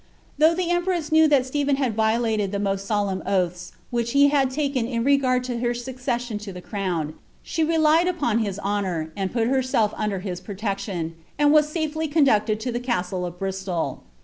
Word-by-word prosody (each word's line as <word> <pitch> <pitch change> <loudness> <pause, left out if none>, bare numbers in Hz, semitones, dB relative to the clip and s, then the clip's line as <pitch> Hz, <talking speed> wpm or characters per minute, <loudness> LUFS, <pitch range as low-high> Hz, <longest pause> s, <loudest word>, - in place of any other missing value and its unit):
Though 320 +2 +5
the 350 -1 -1
empress 350 -3 0
knew 315 0 +6
that 280 -4 +3
Stephen 285 +1 0
had 265 -4 0
violated 220 -2 +1
the 200 - -1
most 195 -1 -2
solemn 200 -3 0
oaths 180 -2 -1 0.2
which 235 -1 -1
he 285 0 +6
had 275 -2 +2
taken 275 -3 -1
in 235 -2 -1
regard 260 -2 +3
to 245 -2 -3
her 240 0 0
succession 245 -2 -3
to 210 -1 -7
the 180 - -8
crown, 180 -6 -3 0.3
she 325 - -1
relied 320 +1 +3
upon 285 -11 +1
his 200 -4 -2
honour, 190 -6 -2
and 195 -2 -2
put 230 -2 +1
herself 255 -5 +1
under 210 -2 -1
his 180 -2 -5
pro 200 +2 -7
tection, 195 -5 -3 0.3
and 295 0 +4
was 300 -1 +5
safely 315 0 -2
conducted 240 -8 +3
to 250 - -2
the 240 - -2
castle 185 -7 -2
of 175 0 -9
Bristol. 190 -2 -3
235 Hz, 190 wpm, -24 LUFS, 195-280 Hz, 0.3 s, knew